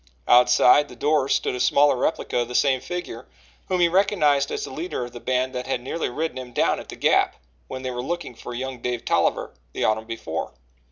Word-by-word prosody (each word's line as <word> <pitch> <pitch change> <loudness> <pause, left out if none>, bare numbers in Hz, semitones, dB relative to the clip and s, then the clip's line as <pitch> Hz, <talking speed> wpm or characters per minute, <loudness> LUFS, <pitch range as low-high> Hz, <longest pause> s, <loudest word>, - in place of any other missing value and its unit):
Outside 125 +3 +6
the 125 - -12
door 145 +1 +1
stood - - +1
a 125 - -4
smaller 145 +3 +4
replica 125 - -1
of 120 - -1
the 125 - -7
same 130 -2 +3
figure, 175 - -6 0.4
whom 185 -1 0
he 170 - +6
recognized 170 -7 +2
as - - -3
the - - -6
leader 155 -3 -4
of 120 - -10
the 120 - -9
band 130 +1 -1
that 125 0 -5
had 135 - -1
nearly 130 +7 -3
ridden 150 +2 -3
him 125 -1 -9
down - - +1
at - - -11
the - - -7
Gap - - +2 0.3
when 130 0 -7
they 130 - -3
were 125 0 -4
looking 175 0 -4
for 120 +1 -8
young 130 0 -5
Dave 120 0 -3
Tolliver, - - 0 0.2
the - - -3
autumn 110 +1 +1
before. 115 - -5
130 Hz, 220 wpm, -23 LUFS, 125-150 Hz, 0.4 s, Outside